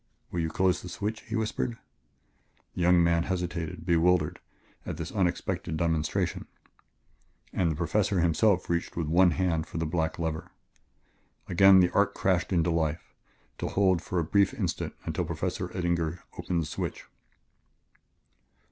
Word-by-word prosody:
"Will 90 - -2
you 80 -1 0
close 90 +1 +1
the - - -8
switch," 110 +2 -4
he 115 - -3
whispered. 110 +1 -2 1.0
The - - -4
young 90 0 +5
man 85 0 +3
hesitated, 85 -3 -3
bewildered, 85 -2 +2 0.4
at - - -5
this 85 0 -5
unexpected 90 -4 -1
demonstration, 80 -2 -1 1.1
and 90 -3 +1
the 80 - -1
Professor 90 +4 +1
himself 85 +3 +2
reached 85 0 -2
with 85 - 0
his 75 - -3
one 90 +1 +6
hand 85 -1 0
for - - -7
the 80 - -1
black 80 0 -1
lever. 80 -1 -3 1.0
Again 95 +1 +7
the 90 - +2
arc 100 0 +2
crashed 95 0 +1
into 85 -2 +2
life, 80 -1 -2 0.5
to - - -2
hold 95 -4 +2
for 95 -1 -4
a 85 - +2
brief 100 +4 +2
instant - - -3
until - - -1
Professor - - -3
Eddinger 85 -2 -2
opened 85 -2 -1
the - - -5
switch. 75 - -5
85 Hz, 150 wpm, -28 LUFS, 80-95 Hz, 1.1 s, Again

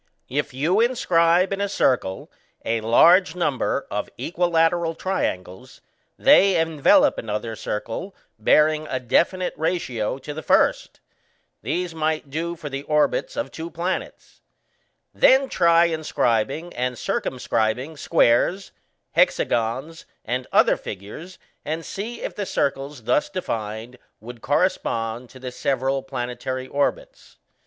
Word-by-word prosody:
If 145 +3 -2
you 155 +10 +1
inscribe 185 -7 +3
in 195 - -3
a 200 - 0
circle 125 - 0 0.3
a 115 0 0
large 170 - +5
number 160 -7 -1
of - - -3
equilateral 170 -1 +1
triangles, 95 - -4 0.4
they 195 -2 +5
envelop 165 - +3
another 110 +1 -4
circle 115 - -5 0.2
bearing 155 +6 +3
a 130 - -2
definite 175 +9 +1
ratio 130 -9 -2
to 140 +2 -7
the 155 - -6
first: - - +1 0.6
these 180 -1 -2
might 155 -2 -2
do 170 +3 -3
for 155 - -8
the 135 -1 -4
orbits 155 - 0
of - - -3
two 165 +1 -6
planets 170 +3 -5 0.7
(see - - -24
Fig. - - -22
27). 265 - +7
Then 270 - -7
try 170 -1 +4
inscribing 155 -1 -1
and 125 0 -2
circumscribing 125 +5 -2
squares, 165 +5 +2 0.4
hexagons, 130 +8 0 0.2
and 125 +2 -3
other - - +4
figures, 105 - -9 0.3
and 160 +2 -4
see 225 +5 -6
if - - -4
the 205 -2 -4
circles 140 -2 -2
thus 145 - +1
defined 115 - -5 0.2
would 120 +1 -11
correspond 125 -7 -1
to 130 - -14
the 130 0 -6
several 135 +1 -1
planetary 130 0 -5
orbits. - - -3
150 Hz, 130 wpm, -23 LUFS, 125-175 Hz, 0.7 s, 27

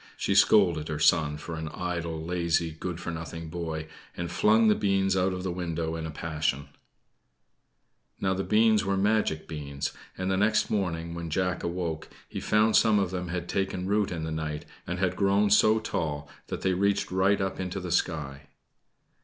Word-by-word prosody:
She 100 - 0
scolded 95 -5 +4
her 75 - -3
son 75 -1 +3
for 80 +2 -7
an 80 0 -4
idle, 85 -1 -3
lazy, 85 -1 0
good 85 +2 -5
for 85 - -4
nothing 80 0 -6
boy, 80 -2 -4 0.3
and 85 0 -3
flung 110 +4 +4
the 105 - +6
beans 95 -2 +1
out 95 0 +2
of 90 0 -4
the 95 - -2
window 85 -2 -3
in 80 -1 -4
a - - -6
passion. 75 -2 -2 1.5
Now 95 -1 +1
the 95 +1 -2
beans 110 0 +4
were 100 0 0
magic 100 -6 +1
beans, 70 -3 -4 0.2
and 95 +1 -1
the 95 - +1
next 105 +3 +2
morning, 85 -5 -1
when 85 -1 -5
Jack 90 +2 0
awoke, 85 -2 -3 0.2
he - - -5
found 110 +1 +3
some 110 -2 +5
of 95 -3 +1
them 90 -1 -3
had 85 0 -4
taken 95 -1 -2
root 100 +1 +1
in 80 -3 -4
the 80 - -3
night 80 -1 -4 0.2
and 90 +1 -2
had 95 0 0
grown 100 +1 +2
so 110 +1 +6
tall, 75 -8 -3 0.2
that - - -5
they 95 - +1
reached 100 +1 +1
right 95 +2 +3
up 95 -1 -2
into 95 +1 -3
the 90 -1 -5
sky. 75 -5 -1
90 Hz, 185 wpm, -28 LUFS, 80-95 Hz, 1.5 s, the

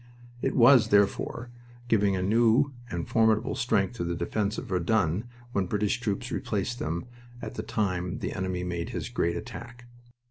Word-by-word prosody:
It - - 0
was, 120 -2 +7
therefore, 105 +3 +1 0.4
giving 100 -4 +3
a 90 - -1
new 115 +7 +3 0.2
and 85 -1 -4
formidable 110 -1 +2
strength 110 -4 +1
to - - -2
the 85 0 -2
defense 100 +5 -1
of - - -4
Verdun 95 0 +1 0.3
when 100 -5 0
British 105 +4 0
troops 120 +2 -3
replaced 115 +3 -2
them 85 +3 -3 0.3
at - - -6
the - - -4
time 90 -4 -1
the - - -4
enemy 95 -1 -2
made 85 -1 -3
his - - -4
great 85 - 0
attack. 120 +1 -9
105 Hz, 165 wpm, -28 LUFS, 90-115 Hz, 0.4 s, was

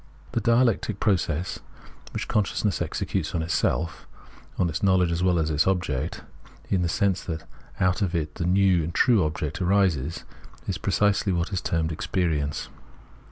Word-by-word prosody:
This - - 0
dialectic 115 -3 +2
process 90 -4 0 0.5
which - - -4
consciousness 105 -1 0
executes 90 -3 -2
on 80 - 0
itself 80 0 -1 0.3
— - - -24
on 90 - +2
its 80 0 -3
knowledge 95 -3 +3
as 85 +1 -1
well 90 -1 +3
as 80 -1 +1
on - - 0
its 75 - +3
object 90 -9 -1 0.2
— - - -23
in 95 - +2
the 85 - 0
sense 95 +3 +1
that 80 -2 -5 0.3
out 90 +2 +2
of 95 -3 0
it 75 -2 -2
the 85 - -3
new 95 -2 +4
and 85 +2 -5
true 115 -7 +4
object 75 +1 -3
arises, 90 -6 +1 0.4
is - - -2
precisely 105 -1 +2
what 85 +3 -1
is 90 - 0
termed 80 -1 0
Experience. 75 -3 -1
90 Hz, 170 wpm, -25 LUFS, 80-95 Hz, 0.5 s, new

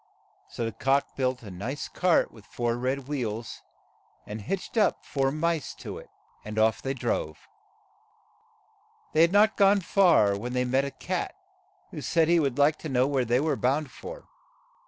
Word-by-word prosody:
So 115 - -4
the 115 - -2
cock 135 +5 0
built 130 -2 -1
a 105 - -9
nice 120 +11 -5
tart 180 -2 +2
with 110 -3 -17
four 120 -1 -1
red 130 +2 -2
wheels, 115 -6 -4 0.6
and 105 +1 -6
hitched 195 - -4
up 220 - +2
four 135 -1 0
mice 160 0 -1
to - - -7
it, - - -14 0.3
and 105 0 -7
off 110 -1 +3
they 135 0 -2
drove. - - -3 1.7
They 155 - +4
had 170 +1 +5
not 210 +2 +4
gone 200 0 +5
far 165 - +4
when 120 +5 -5
they 125 0 +1
met 130 +2 +1
a - - -3
cat, 130 - -4 0.6
who - - -6
said 165 -1 +2
he 170 0 +5
would 140 -5 0
like 145 +2 +4
to 155 - -6
know 130 -1 +3
where 135 -2 0
they 120 +2 +2
were 155 +2 +1
bound 135 +2 0
for. - - -9
135 Hz, 175 wpm, -27 LUFS, 120-160 Hz, 1.7 s, had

